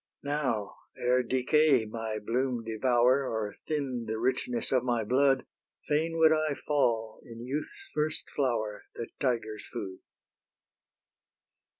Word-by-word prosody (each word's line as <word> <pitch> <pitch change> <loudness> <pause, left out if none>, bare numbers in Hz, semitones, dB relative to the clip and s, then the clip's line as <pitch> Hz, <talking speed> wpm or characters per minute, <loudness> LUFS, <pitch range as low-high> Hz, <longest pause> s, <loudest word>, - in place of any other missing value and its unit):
Now, 140 -8 -1 0.2
ere 125 +1 +3
decay 130 +1 +3
my 110 0 -4
bloom 120 +2 -1
devour 120 +4 +3
Or 110 -2 -2
thin 135 -6 -2
the 110 0 -2
richness 120 0 0
of 130 -2 +3
my 120 -3 +1
blood, 135 +4 +3 0.4
Fain 160 +2 0
would 160 -1 +6
I 155 -2 +1
fall 115 -8 0
in 115 0 -9
youth's 155 - -5
first 155 +1 -1
flower, 115 -6 -1
The 115 - -5
tigers' 115 -5 -1
food. 95 -6 -5
125 Hz, 120 wpm, -30 LUFS, 115-140 Hz, 0.4 s, would